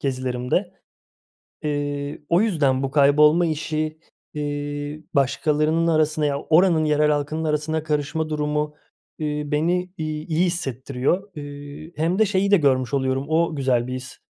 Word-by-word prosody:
gezilerimde. 130 +6 -1 0.9
Eee, 145 -1 -3
o 170 +3 +4
yüzden 145 -11 +1
bu 135 - -2
kaybolma 150 +4 +5
işi, 155 0 -2 0.3
eee, 145 +1 -4
başkalarının 150 +4 +2
arasına 155 -1 +2
ya, 140 -1 0
oranın 165 -1 +4
yerel 150 0 +3
halkının 150 +2 -1
arasına 155 +1 -1
karışma 155 +1 -1
durumu, 150 0 -1 0.4
eee, 150 -1 -2
beni, 175 +5 0
iii, 155 -1 -4
iyi 165 +2 +2
hissettiriyor. 145 - -2
Eee, 145 +1 -9
hem 165 +6 0
de 220 - +6
şeyi 200 0 +1
de 200 - +7
görmüş 130 -4 +1
oluyorum, 130 0 0
o 165 0 +1
güzel 125 -3 +1
bir 130 - -4
his. 130 0 -7
150 Hz, 140 wpm, -23 LUFS, 145-160 Hz, 0.9 s, de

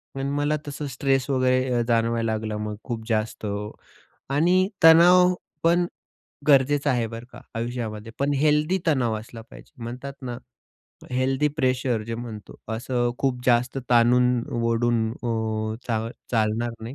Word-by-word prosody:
पण 135 0 -2
मला 145 +1 +1
तसं 145 0 -5
स्ट्रेस 135 +1 0
वगैरे 130 -1 +2
अ, - - +2
जाणवायला 115 -1 +1
लागलं 110 -1 -3
मग 105 0 -4
खूप 115 -3 -5
जास्त. 110 0 -1 0.8
आणि 175 +7 +3
तणाव 180 +3 +7 0.3
पण 170 +1 +3 0.6
गरजेचा 140 0 +4
आहे 120 -3 0
बरं 115 +1 -8
का, - - -12
आयुष्यामध्ये. 115 -2 -4
पण 140 +1 +1
हेल्दी 150 +5 +2
तणाव 125 -7 +2
असला 115 +1 -11
पाहिजे. - - -15
म्हणतात 125 +4 -6
ना 125 -2 -5 0.7
हेल्दी 130 +3 +1
प्रेशर 130 -4 0
जे 115 - -3
म्हणतो, 115 -3 -8 0.2
असं 120 +1 -1
खूप 135 -2 0
जास्त 125 +2 +2
ताणून-ओढून 120 -1 +2
अ, 110 -2 -2
चा 115 -2 0 0.3
चालणार 115 +1 +1
नाही. 115 +4 -6
125 Hz, 135 wpm, -24 LUFS, 115-140 Hz, 0.8 s, तणाव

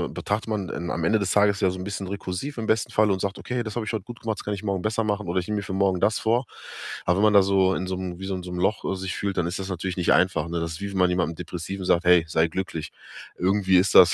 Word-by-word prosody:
betrachtet 105 +2 -2
man 95 -5 -3
am 85 - -2
Ende 110 +6 +3
des 100 -2 -1
Tages 100 -1 +3
ja 95 - +3
so 95 - -4
'n 90 - -5
bisschen 100 0 -4
rekursiv, 100 +8 -5
im 115 - -3
besten 110 -1 +1
Fall, 105 -1 +3
und 95 -1 0
sagt: 100 -1 -2
„Okay, 125 0 -3
das 110 -2 -5
habe 120 -2 -2
ich 110 - -4
heut 110 - -2
gut 120 -1 -10
gemacht, 110 -1 -3
das - - -7
kann 105 - -2
ich 100 - -9
morgen 100 -3 -1
besser 110 +2 0
machen 105 -2 -2
oder 90 +2 +1
ich 90 - -5
nehme 105 - -1
mir - - -1
für 95 - -5
morgen 95 -1 +2
das 105 +3 +2
vor.“ 120 +3 +1 0.6
Aber 90 +1 +2
wenn 100 - +2
man 105 - +4
da 100 -1 +7
so 95 -1 +3
in 95 - -2
so 95 0 -2
'nem 90 -1 -5
wie 95 - -7
so 95 - -3
'n 90 - -3
so 90 - -8
'nem 90 0 -4
Loch 95 +4 +1
sich 95 0 -4
fühlt, 100 -1 -2
dann 90 - +1
ist 85 +3 -3
das 95 0 -5
natürlich 90 0 -3
nicht 90 -2 +1
einfach, 90 -3 +3
ne? 85 0 -2
Das 85 0 -3
ist, 80 - -7
wie 100 - -3
wenn 100 - -5
man 90 -1 +4
jemandem 85 -2 0
depressiv 90 +3 -6
sagt: 85 -1 +3
„Hey, 90 -2 +6
sei 80 +1 +2
glücklich.“ 85 -2 -4 0.5
Irgendwie 95 0 +3
ist 90 +1 +3
das 85 -2 +8
95 Hz, 315 wpm, -25 LUFS, 90-105 Hz, 0.6 s, das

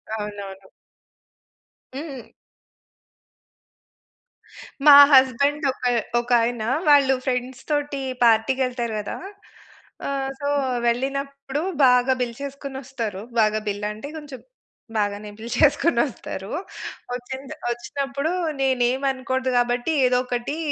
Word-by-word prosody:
అవునవును. 200 -2 -7 1.3
హ్మ్. 275 -4 -7 2.6
మా 295 - +11 0.2
హస్బెండ్ 280 +3 +4
ఒక 260 - -9 0.3
ఒకాయన 240 -1 +1 0.3
వాళ్ళు 280 -2 +6
ఫ్రెండ్స్ 255 0 -2
తోటి 290 -1 -1 0.2
పార్టీకెళ్తారు 240 +1 +2
కదా! 205 - -5 0.9
ఆహ్! 270 -1 -2
సొ, 285 - -3 0.4
వెళ్ళినప్పుడు 275 +3 -2 0.2
బాగా 250 +1 +4
బిల్ 240 -1 -2
చేసుకొని 280 -1 -6
వస్తారు 230 -7 -5 0.2
బాగా 215 0 +3
బిల్ 205 0 -3
అంటే 215 +7 -8
కొంచెం 290 -4 -9 0.6
బాగానే 205 0 -2
బిల్‌ 230 +2 -7
చేసుకొని 300 -1 +4
వస్తారు. 200 -6 -7 0.6
వచ్చింద్ 260 +2 -7 0.2
వచ్చినప్పుడు 275 +5 -3 0.3
నేను 260 -2 +2
ఏమి 265 +2 -3
అనకూడదు 260 0 -2
కాబట్టి, 245 +4 +1
ఏదో 250 0 +3
ఒకటి 245 +4 -3
255 Hz, 100 wpm, -23 LUFS, 235-275 Hz, 2.6 s, మా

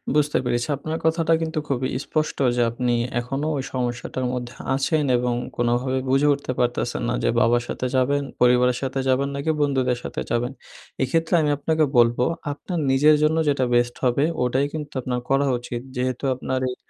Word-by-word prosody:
বুঝতে 150 0 +2
পেরেছি। 120 +1 0
আপনার 155 +3 -4
কথাটা 165 0 +2
কিন্তু 160 -1 -2
খুবই 130 -2 -1
স্পষ্ট 155 +3 -2 0.2
যে 120 - +1
আপনি 120 +1 -1 0.3
এখনো 135 +5 -3
ওই 135 - -2
সমস্যাটার 125 0 -3
মধ্যে 120 -1 -4 0.2
আছেন 150 +3 +1
এবং 125 0 0 0.2
কোনভাবে 120 +2 +1
বুঝে 135 +3 +3
উঠতে 140 -2 -4
পারতেছেন 120 0 0
না - - 0
যে - - +2
বাবার 120 +1 +3
সাথে - - -3
যাবেন? 140 +2 +2 0.2
পরিবারের 125 0 +4
সাথে 135 0 -2
যাবেন? 130 +1 +2
নাকি 140 +3 0
বন্ধুদের 130 -4 +1
সাথে - - -4
যাবেন। 120 +2 0 0.5
এক্ষেত্রে 165 +6 0
আমি 150 - +1
আপনাকে 155 +2 +1
বলব, 120 0 +5 0.3
আপনার 170 +4 -4
নিজের 150 +3 +5
জন্য 155 +1 +3
যেটা 135 -2 +1
বেস্ট 120 0 +2
হবে 125 +3 +2 0.2
ওটাই 130 +3 +1
কিন্তু 150 -2 -6
আপনার 125 0 -2
করা 135 +1 +3
উচিত। 120 0 -5
যেহেতু 125 +1 -2
আপনার 130 +1 -2
এই 125 - -5
130 Hz, 175 wpm, -23 LUFS, 125-145 Hz, 0.5 s, বলব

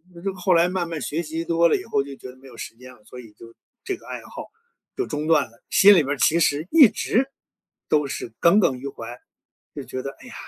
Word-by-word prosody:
那 170 - -11
就 195 +1 -3
后 185 0 +1
来 170 +1 +4
慢 180 -2 -2
慢 165 -4 -5
学 155 +6 -2
习 160 +1 -4
多 170 0 +3
了 - - +2
以 - - -8
后 140 - 0
就 140 -1 -9
觉 130 - -11
得 125 - -13
没 135 - -16
有 125 - -14
时 - - -8
间 125 +2 -14
了， 105 - -22
所 125 - -11
以 115 -4 -13
就 115 +1 -15 0.3
这 385 - -3
个 - - -20
爱 - - -6
好 - - -9 0.5
就 390 - -2
中 150 +1 -4
断 160 -3 +4
了。 115 +1 -25
心 205 +1 +7
里 160 - +4
面 135 - -6
儿 145 - -1
其 165 +5 +3
实 155 0 +1
一 300 -7 +8
直 265 +7 -1 0.6
都 150 -1 +2
是 120 - -6
耿 180 +5 +5
耿 135 -9 +2
于 140 - -7
怀， 120 -2 -8 0.6
就 - - -6
觉 130 - -6
得， 135 - -5
哎 - - -14
呀， 240 - -11
155 Hz, 285 characters per minute, -23 LUFS, 130-175 Hz, 0.6 s, 一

